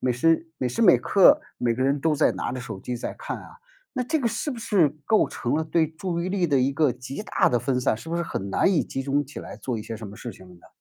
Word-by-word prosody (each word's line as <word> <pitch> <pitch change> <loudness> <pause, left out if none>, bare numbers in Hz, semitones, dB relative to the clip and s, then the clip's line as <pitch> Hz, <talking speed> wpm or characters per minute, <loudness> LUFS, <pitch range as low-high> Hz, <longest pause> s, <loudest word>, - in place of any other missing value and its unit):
每 125 - +1
时 165 +6 +2
每 130 - -1
时 125 - -3
每 190 -6 +7
刻， 195 -2 +5 0.2
每 120 -1 +1
个 130 - -1
人 140 +1 +1
都 155 +1 +2
在 150 - +3
拿 - - -3
着 130 - -4
手 100 -6 -7
机 125 -1 -4
在 - - -5
看 - - -4
啊。 - - -13 0.3
那 255 -3 -1
这 315 +6 0
个 245 - -1
是 265 +6 -3
不 250 - -5
是 205 -9 +3 0.2
构 215 +4 +3
成 120 +3 -2
了 160 - +1
对 160 0 +1
注 170 +2 -4
意 185 - -2
力 190 -3 +1
的 140 -3 +2
一 135 +2 +2
个 145 -1 +3
极 130 +9 -6
大 - - +2
的 120 - +2
分 125 +1 0
散， 125 - +2
是 160 - -10
不 170 - -1
是 170 - 0
很 100 -10 -4
难 190 - +2
以 165 - +3
集 135 - -4
中 140 +2 +1
起 145 - -9
来 - - -9
做 120 -4 -3
一 - - -6
些 110 +1 -6
什 110 -2 -8
么 100 - -11
事 120 0 -7
情 95 - -15
了 90 - -14
呢？ 85 - -19
145 Hz, 320 characters per minute, -25 LUFS, 125-170 Hz, 0.3 s, 每